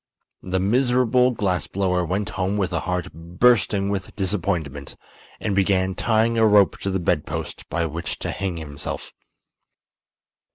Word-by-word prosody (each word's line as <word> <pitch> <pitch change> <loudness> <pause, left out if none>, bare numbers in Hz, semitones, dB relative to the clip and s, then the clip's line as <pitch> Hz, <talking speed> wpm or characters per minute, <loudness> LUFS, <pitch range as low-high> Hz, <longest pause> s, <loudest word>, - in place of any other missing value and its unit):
The 95 0 -1
miserable 125 +4 +3
glass 100 -7 -1
blower 90 -2 0
went 95 +4 -2
home 95 0 -1
with 95 -3 -1
a 85 - +1
heart 90 +1 -3
bursting 100 +4 +2
with 100 -2 -4
disappointment 90 -8 -2 0.4
and 105 - -1
began 95 -1 +2
tying 115 +3 +1
a 110 - +5
rope 105 -2 +4
to 100 - -2
the 95 0 0
bedpost 85 - -2
by 85 -1 0
which 80 +1 -4
to - - -3
hang 95 -4 -3
himself. 75 -3 -6
95 Hz, 140 wpm, -23 LUFS, 90-105 Hz, 0.4 s, a